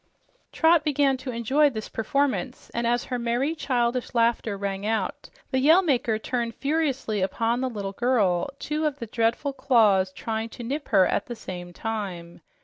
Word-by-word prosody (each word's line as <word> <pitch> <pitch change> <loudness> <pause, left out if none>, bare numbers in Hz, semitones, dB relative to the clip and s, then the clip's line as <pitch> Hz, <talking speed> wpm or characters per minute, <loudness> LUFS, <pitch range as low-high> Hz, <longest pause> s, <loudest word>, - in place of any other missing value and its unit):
Trot 325 0 +4
began 285 -2 +2
to 260 +1 -7
enjoy 260 +5 +2
this 220 -5 -6
performance, 265 +2 -1
and 235 0 -1
as 240 +1 +1
her 250 - -3
merry, 240 +6 0
childish 250 -5 -1
laughter 230 -3 +1
rang 195 0 -3
out, 220 +1 -2 0.2
the 260 - +2
Yell 320 +8 +6
Maker 245 -8 +1
turned 235 0 -3
furiously 275 -8 -1
upon 230 +6 0
the 260 - 0
little 200 -4 -5
girl, 210 -5 +1
two 305 +2 -1
of 290 -2 -3
the 235 - -5
dreadful 230 +5 0
claws 220 -9 +3
trying 220 +3 -4
to 240 - -9
nip 285 +5 -4
her 195 -4 +5
at 300 - -1
the 240 - -5
same 180 -5 -8
time. 180 -4 -5
235 Hz, 170 wpm, -25 LUFS, 215-275 Hz, 0.2 s, Yell